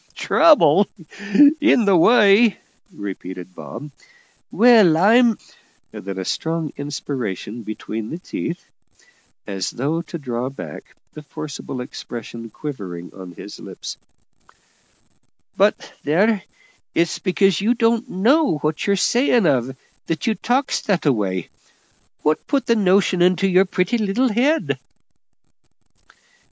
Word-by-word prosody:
"Trouble! 200 - +4 0.7
in 295 -7 +3
the 200 -2 +4
way!!" 205 +2 +5 0.3
repeated 95 -2 -8
Bob; 145 +10 -9 0.6
"Well, 220 -9 +5
I'm 225 +5 +4 0.3
" - - -39
then 95 0 -7
a 95 - -4
strong 160 - -2
inspiration 125 - -5
between 110 0 -6
the 165 - -5
teeth, 175 -1 -6 0.8
as 95 -2 -3
though 150 +7 -2
to 170 +1 -8
draw 125 -3 -4
back 135 - -10 0.2
the 155 - -9
forcible 150 -4 -7
expression 115 -2 -8
quivering 95 - -7
on 95 -2 -10
his - - -10
lips - - -8 1.6
"but - - +1
there, 195 +7 +2 0.5
it's 170 0 0
because 195 -1 +1
you 230 +4 +2
don't 235 +1 +1
know 245 - +2
what 150 +4 -2
you're 200 - +3
sayin' 235 +2 +2
of, 130 -3 0 0.3
that 165 +8 -3
you 225 - +2
talks 255 +5 -1
that 195 -6 -1
a 145 - +4
way. 95 -6 -3 0.7
What 155 +1 0
put 280 -2 0
that 230 - +2
notion 190 -3 +2
into 185 +2 +3
your 185 +1 +4
pretty 185 +5 -1
little 220 +5 +1
head?" 235 - +1
170 Hz, 120 wpm, -20 LUFS, 130-215 Hz, 1.6 s, way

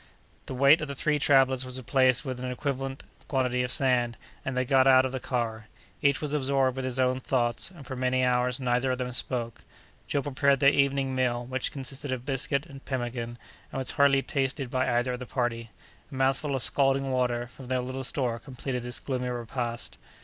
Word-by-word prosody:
The 130 - -5
weight 140 +5 +6
of 155 - -3
the 140 - -5
three 150 +2 +1
travellers 135 -2 +4
was 130 0 -7
replaced 130 +1 +2
with 130 -2 -4
an 130 0 -4
equivalent 135 0 -3 0.2
quantity 125 -2 +1
of 125 0 -1
sand, 120 -4 +2 0.3
and 130 -1 -3
they 130 - +1
got 130 +1 +4
out 130 0 +7
of 130 - -2
the 130 - -3
car. 115 -4 -3 0.3
Each 140 -2 +3
was 150 -1 -2
absorbed 135 -2 +1
in 130 - -3
his 130 0 -2
own 130 0 +2
thoughts; 120 0 0
and 170 -7 -13
for 130 - -6
many 130 0 +1
hours 125 0 +1
neither 125 0 +1
of 130 - -1
them 125 0 -3
spoke. 120 -1 -2 0.5
Joe 140 - 0
prepared 140 -1 +2
their 140 +1 +6
evening 140 -1 +1
meal, 125 -2 0
which 130 +1 -2
consisted 135 -1 -5
of 130 -1 -3
biscuit 140 +1 0
and 140 -5 -12
pemmican, 120 -2 -4 0.3
and - - -5
was 130 -1 0
hardly 140 -1 +4
tasted 135 -2 -2
by 130 0 +1
either 120 +1 +1
of 125 - -5
the 125 - -7
party. 115 -2 -2 0.4
A - - -7
mouthful 135 +2 +1
of 130 - +3
scalding 135 -1 +2
water 125 -2 0
from 125 +1 -12
their 130 0 0
little 130 +1 -5
store 125 -3 -1
completed 130 -1 -5
this 120 0 -3
gloomy 125 -2 -3
repast. 120 0 -4
130 Hz, 205 wpm, -28 LUFS, 125-135 Hz, 0.5 s, out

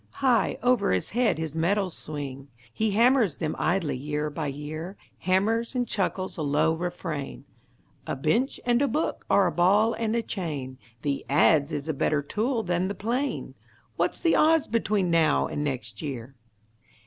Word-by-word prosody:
High 255 -4 +2
over 245 -4 +3
his 95 - 0
head 235 -6 +2
his 160 -1 -4
metals 185 +2 +1
swing; 140 -2 -6 0.3
He 220 0 0
hammers 230 - +3
them 155 -2 -3
idly 170 -4 0
year 150 +3 -3
by 150 0 -3
year, 155 +6 -6 0.2
Hammers 220 +7 +1
and 245 -1 0
chuckles 190 -2 -2
a - - -3
low 150 +2 +2
refrain: 165 -5 -5 0.6
"A - - -1
bench 220 - 0
and 240 +1 +3
a 285 - +3
book 305 +4 -2
are 200 - +5
a - - +1
ball 205 +6 +3
and 225 0 -1
a 235 - 0
chain, 145 - -4 0.2
The 140 -1 -1
adze 145 +1 +4
is 145 0 -4
a 160 - 0
better 145 +1 0
tool 225 - -1
than 180 0 0
the 200 - -4
plane; 250 +7 -2 0.4
What's - - 0
the 335 - +3
odds 320 0 +4
between 210 -5 +1
now 160 -3 +3
and 145 - -3
next 120 -7 -4
year?" 135 -3 -6
175 Hz, 170 wpm, -26 LUFS, 150-225 Hz, 0.6 s, are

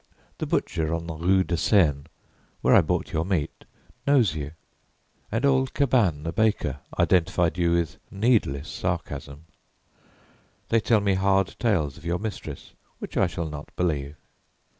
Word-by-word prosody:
The - - -2
butcher 80 0 0
on 85 0 -5
the 85 - -5
rue 95 +4 +2
de 90 - -2
Seine, 75 -8 +3 0.6
where - - +4
I - - +8
bought - - -2
your 80 - +1
meat, 85 -5 -2 0.4
knows 125 - +4
you, 75 -1 -5 0.8
and 115 +5 0
old 130 -1 +2
Cabane 115 - +2
the 80 +1 -3
baker 100 -11 +1 0.2
identified 85 -2 +2
you 85 -1 +2
with 85 -3 0
needless 100 - +1
sarcasm. 70 +3 -4 1.2
They 115 - +4
tell 110 -1 +2
me 100 -1 +2
hard 95 0 +2
tales 85 - 0
of - - -16
your 85 +1 0
mistress 105 -1 -7 0.2
which - - -8
I 95 - +3
shall 85 0 -4
not 75 -1 -8
believe. 75 -5 -1
85 Hz, 150 wpm, -25 LUFS, 80-105 Hz, 1.2 s, I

